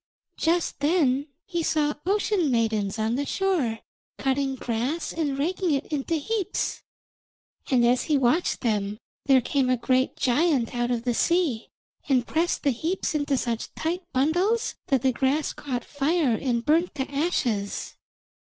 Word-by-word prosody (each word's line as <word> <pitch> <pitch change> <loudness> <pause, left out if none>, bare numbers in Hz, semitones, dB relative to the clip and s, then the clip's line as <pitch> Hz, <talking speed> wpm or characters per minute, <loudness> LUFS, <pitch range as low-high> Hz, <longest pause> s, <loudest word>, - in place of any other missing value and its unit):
Just 335 +1 0
then 290 -3 +2 0.2
he 345 -2 -2
saw 310 -2 +1
ocean 405 -4 +1
maidens 220 -4 0
on 220 +1 0
the 280 +3 -1
shore, 320 - 0 0.4
cutting 270 0 0
grass 250 +7 -2
and 295 -4 -1
raking 345 +2 0
it 275 - -2
into 295 +3 -1
heaps. 405 +5 -2 0.9
And 245 -3 +4
as 245 +1 +3
he 300 -3 +2
watched 270 +7 +1
them 210 -3 -1 0.3
there 265 -2 +6
came 265 +1 0
a 255 - +3
great 255 +2 +1
giant 270 -1 +2
out 240 0 0
of 240 -2 -1
the 245 -1 0
sea 325 -5 +1 0.4
and 255 -3 +3
pressed 335 +6 0
the 280 - +3
heaps 325 +10 -2
into 290 -2 0
such 235 -2 -2
tight 340 +3 -2
bundles 350 - +1
that 270 -2 +1
the 260 -1 +3
grass 275 +4 0
caught 255 -4 -4
fire 290 -1 +1
and 235 0 -1
burnt 330 +2 +2
to 270 - -1
ashes. 245 - -1
275 Hz, 150 wpm, -25 LUFS, 245-325 Hz, 0.9 s, there